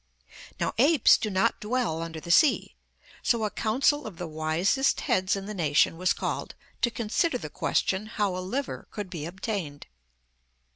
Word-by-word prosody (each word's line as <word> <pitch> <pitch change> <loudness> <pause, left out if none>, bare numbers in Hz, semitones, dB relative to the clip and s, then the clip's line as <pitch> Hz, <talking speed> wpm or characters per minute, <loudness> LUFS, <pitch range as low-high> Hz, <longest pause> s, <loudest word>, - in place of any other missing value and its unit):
Now - - -1
apes 285 0 +6
do 215 - -2
not 190 -1 +1
dwell 215 -7 -1
under 165 -1 -5
the 170 - -5
sea, 300 - +4 0.5
so 230 -2 +1
a 210 - -1
council 270 +6 +1
of 195 -6 -9
the 180 - -4
wisest 160 - +1
heads 185 +1 +1
in 195 0 -5
the 210 - -5
nation 160 -4 +2
was 185 +3 +1
called - - -3 0.3
to 240 - +3
consider 235 +9 0
the - - -8
question 195 +3 0
how 205 -4 -1
a - - -3
liver 255 +10 -4
could 205 -4 -6
be 160 -4 -5
obtained. 180 -5 -5
195 Hz, 165 wpm, -27 LUFS, 170-230 Hz, 0.5 s, apes